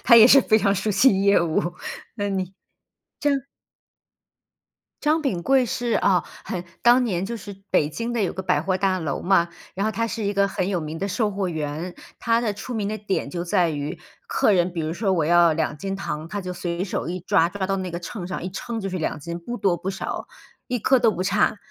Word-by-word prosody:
他 235 - +7
也 225 0 +10
是 275 +2 +8
非 220 -3 +3
常 200 -2 +2
熟 205 +2 -1
悉 195 -1 +4
业 200 -2 +5
务， 170 +1 0 0.4
那 205 -2 -1
你， 190 -1 -2 0.7
张 280 -2 +1 1.6
张 310 +2 +2
秉 190 - -1
贵 265 +2 +4
是 240 0 -2
啊， 180 -3 +3 0.2
很 180 -2 -4 0.2
当 240 +2 +6
年 185 -5 -1
就 235 +4 -4
是 205 -2 -8 0.2
北 145 - +3
京 230 +10 -4
的 235 - 0
有 185 - 0
个 190 - -4
百 145 - +2
货 185 +4 0
大 190 -1 +1
楼 155 -5 -3
嘛， 175 -2 +3 0.3
然 195 +2 -1
后 220 - +1
他 230 +2 -1
是 225 0 -4
一 200 0 0
个 200 0 +3
很 190 -1 -2
有 185 -3 0
名 155 +1 -5
的 195 - -2
售 215 +1 0
货 195 -2 -2
员。 160 +2 -4 0.2
他 230 0 +2
的 225 -3 0
出 220 +5 -7
名 210 -3 -1
的 215 +1 -3
点 200 -1 -2
就 175 -1 -3
在 175 -2 +2
于， 145 -1 -4 0.3
客 450 - +2
人 180 -1 +3
比 170 - -3
如 155 +1 -2
说 195 +1 0
我 165 -4 +1
要 170 +1 +5
2 150 -2 -1
斤 195 +4 -3
糖， 155 -4 -4
他 205 +3 -3
就 180 0 -4
随 175 0 -3
手 185 - -3
一 180 +1 -3
抓， 165 -1 +3
抓 190 0 -3
到 195 +1 0
那 185 -2 -3
个 170 - -4
秤 180 0 -6
上， 185 - -4
一 185 - -3
称 235 +4 -5
就 195 - -3
是 185 - -3
2 155 - -2
斤， 170 +3 -6
不 240 +8 -6
多 190 -6 +2
不 180 - -5
少， 195 - -5 0.4
一 250 - 0
颗 260 +4 +4
都 230 -2 +4
不 185 - -3
差。 200 +3 +2
195 Hz, 245 characters per minute, -24 LUFS, 175-220 Hz, 1.6 s, 也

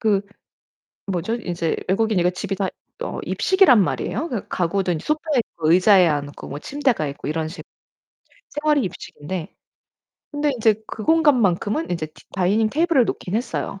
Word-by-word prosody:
그 210 -3 +2 0.9
뭐죠? 185 +5 -1
이제 175 -7 -2
외국이니까 195 -2 +2
집이 195 +2 -4
다 195 -1 -1 0.3
어 - - -4
입식이란 375 - +4
말이에요. 310 - -1
그 240 - -4
가구도 185 +1 0
인제 160 -3 -3
소파에 305 -3 +1
뭐 160 -1 +1
의자에 185 +1 +6
앉고 145 -2 -3
뭐 145 - -5
침대가 260 - 0
있고 140 +1 -6
이런 160 0 -1
식 165 - -9 0.9
생활이 295 -1 +1
입식인데 175 -2 -6 0.8
근데 290 0 0
인제 220 -4 +1
그 215 - -7
공간만큼은 285 - +2
인제 170 -2 -1
디 155 - -19
다이닝 200 +4 +2
테이블을 315 -3 +3
놓긴 185 - -4
했어요, 225 -4 -3
205 Hz, 340 characters per minute, -22 LUFS, 175-270 Hz, 0.9 s, 의자에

